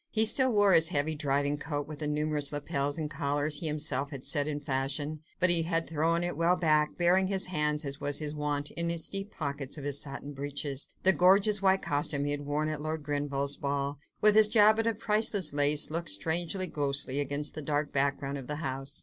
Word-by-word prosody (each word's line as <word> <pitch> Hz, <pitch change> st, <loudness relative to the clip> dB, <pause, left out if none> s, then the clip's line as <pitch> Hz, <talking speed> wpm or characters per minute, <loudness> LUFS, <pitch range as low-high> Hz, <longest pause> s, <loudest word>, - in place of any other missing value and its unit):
He 220 Hz, 0 st, +3 dB
still 260 Hz, +3 st, +6 dB
wore 205 Hz, -3 st, +4 dB
his 165 Hz, -1 st, +6 dB
heavy 155 Hz, -1 st, +1 dB
driving 145 Hz, -1 st, -1 dB
coat 145 Hz, -2 st, -4 dB
with 155 Hz, -1 st, -9 dB
the 150 Hz, -, -3 dB
numerous 150 Hz, -1 st, -1 dB
lapels 145 Hz, 0 st, -2 dB
and 155 Hz, -2 st, -3 dB
collars 145 Hz, 0 st, -1 dB
he 165 Hz, -, -3 dB
himself 145 Hz, -2 st, -1 dB
had 135 Hz, -3 st, -8 dB
set 145 Hz, -2 st, +2 dB
in 150 Hz, -1 st, -3 dB
fashion, 145 Hz, +2 st, -3 dB, 0.2 s
but 185 Hz, -1 st, +5 dB
he 170 Hz, -1 st, +7 dB
had 165 Hz, 0 st, -1 dB
thrown 165 Hz, +2 st, 0 dB
it 175 Hz, -2 st, -3 dB
well 170 Hz, +3 st, +2 dB
back, 155 Hz, -3 st, +1 dB
burying 180 Hz, +2 st, +2 dB
his 190 Hz, -1 st, +1 dB
hands 150 Hz, -3 st, -1 dB
as 140 Hz, 0 st, -6 dB
was 145 Hz, -1 st, 0 dB
his 150 Hz, -1 st, -3 dB
wont, 150 Hz, -1 st, -3 dB
in 170 Hz, 0 st, -2 dB
the 170 Hz, 0 st, -1 dB
deep 195 Hz, +1 st, -3 dB
pockets 140 Hz, -6 st, -5 dB
of 145 Hz, -, -8 dB
his 140 Hz, 0 st, -1 dB
satin 140 Hz, +1 st, -5 dB
breeches: 140 Hz, 0 st, -4 dB
the 190 Hz, -, +6 dB
gorgeous 195 Hz, +4 st, +4 dB
white 195 Hz, 0 st, +2 dB
costume 145 Hz, 0 st, -1 dB
he 145 Hz, -, -2 dB
had 145 Hz, 0 st, -4 dB
worn 150 Hz, +1 st, -1 dB
at 155 Hz, -1 st, -4 dB
Lord 155 Hz, 0 st, -4 dB
Grenville's 145 Hz, -1 st, -2 dB
ball, 140 Hz, 0 st, -3 dB, 0.2 s
with 210 Hz, 0 st, +5 dB
its 215 Hz, -1 st, +6 dB
jabot 215 Hz, +1 st, +4 dB
of 225 Hz, -2 st, -1 dB
priceless 210 Hz, -7 st, 0 dB
lace, 145 Hz, +1 st, +3 dB
looked 170 Hz, +2 st, -2 dB
strangely 170 Hz, -, 0 dB
ghostly 140 Hz, -4 st, -1 dB
against 145 Hz, +1 st, -3 dB
the 155 Hz, -, -5 dB
dark 145 Hz, 0 st, -2 dB
background 140 Hz, 0 st, -1 dB
of 130 Hz, -, -10 dB
the 150 Hz, -, -3 dB
house. 135 Hz, -1 st, -5 dB
150 Hz, 215 wpm, -29 LUFS, 145-170 Hz, 0.2 s, he